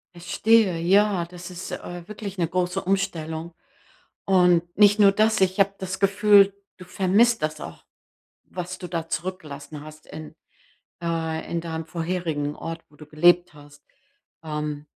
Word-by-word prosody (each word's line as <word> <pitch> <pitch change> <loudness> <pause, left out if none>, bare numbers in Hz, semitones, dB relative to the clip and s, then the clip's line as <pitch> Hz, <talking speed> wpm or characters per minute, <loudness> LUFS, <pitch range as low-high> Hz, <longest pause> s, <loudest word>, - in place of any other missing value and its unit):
Verstehe, 190 +2 +2
ja, 195 +2 +3
das 175 +1 -10
ist, 180 +1 -8
äh, 175 -1 -7
wirklich 205 -2 -7
'ne 170 - 0
große 180 +2 -1
Umstellung. 170 -4 -2 0.7
Und 180 -3 +4
nicht 205 0 +5
nur 200 -1 +7
das, 215 +1 +2
ich 190 +1 +1
habe 195 0 +3
das 190 0 -5
Gefühl, 200 0 +5 0.2
du 185 - -12
vermisst 200 +6 +2
das 155 0 -3
auch, - - -10 0.6
was 180 0 -6
du 180 - -7
da 165 -2 -4
zurückgelassen 150 -4 -6
hast 155 0 -13
in, 155 0 -10 0.7
äh, 165 -1 -3
in 170 - -1
deinem 160 -1 -5
vorherigen 160 -3 -3
Ort, 165 0 -7
wo 150 - -22
du 150 - -13
gelebt 175 +3 +3
hast. 145 0 -17 0.6
Ähm 150 -1 -4
175 Hz, 150 wpm, -24 LUFS, 160-195 Hz, 0.7 s, nur